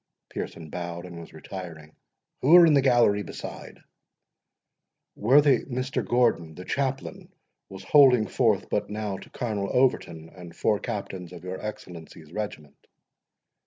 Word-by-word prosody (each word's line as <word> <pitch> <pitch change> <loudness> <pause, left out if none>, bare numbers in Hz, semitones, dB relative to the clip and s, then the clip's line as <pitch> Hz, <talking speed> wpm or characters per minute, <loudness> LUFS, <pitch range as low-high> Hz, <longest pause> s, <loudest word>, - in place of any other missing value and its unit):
Pearson 80 -3 -7
bowed, 85 0 -5
and 85 -2 -9
was 85 - -11
retiring. 80 -2 -9 0.4
"Who 150 +7 +5
are 175 -1 +9
in 160 - +4
the 140 - +5
gallery 120 -6 +3
beside?" 95 - -9 1.3
"Worthy 135 +3 +4
Mr. 130 0 -3
Gordon, 115 -10 +1
the 90 - -9
chaplain, 135 -1 -3 0.4
was 95 0 -10
holding 130 -2 +6
forth - - +1
but - - -1
now 105 -2 -4
to - - -13
Colonel 105 -5 -3
Overton, 85 -11 0
and 85 -2 -12
four 105 +3 +1
captains 95 -6 -6
of 85 -1 -11
your 90 +1 -6
Excellency's 85 -7 -9
regiment." 100 -9 -7
100 Hz, 135 wpm, -26 LUFS, 85-125 Hz, 1.3 s, are